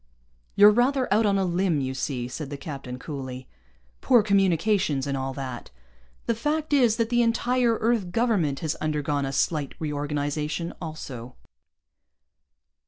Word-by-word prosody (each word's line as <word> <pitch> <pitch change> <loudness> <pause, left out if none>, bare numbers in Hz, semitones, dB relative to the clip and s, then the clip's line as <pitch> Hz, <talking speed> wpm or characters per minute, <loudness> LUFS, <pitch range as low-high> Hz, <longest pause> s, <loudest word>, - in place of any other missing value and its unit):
"You're 205 +1 +8
rather 255 +4 +2
out 215 +1 +3
on 200 -1 +2
a 195 - +1
limb, 175 -2 +1
you 130 -1 -2
see," 130 -2 -3
said 135 +3 -6
the 145 - -5
captain 135 -3 -7
coolly. 130 -2 -7 0.5
"Poor 240 -4 +5
communications 195 -6 +2
and 140 -1 -2
all 135 0 -2
that. 130 -3 -6 0.6
The - - +1
fact 300 +6 -2
is 245 -6 +4
that 230 -1 0
the 240 0 +3
entire 235 +1 +2
Earth 220 -5 0
Government 195 - +1
has 160 -2 -1
undergone 150 -2 -1
a - - -3
slight 145 0 -1
reorganization 150 +2 -2
also." 130 -7 -7
160 Hz, 145 wpm, -25 LUFS, 140-225 Hz, 0.6 s, You're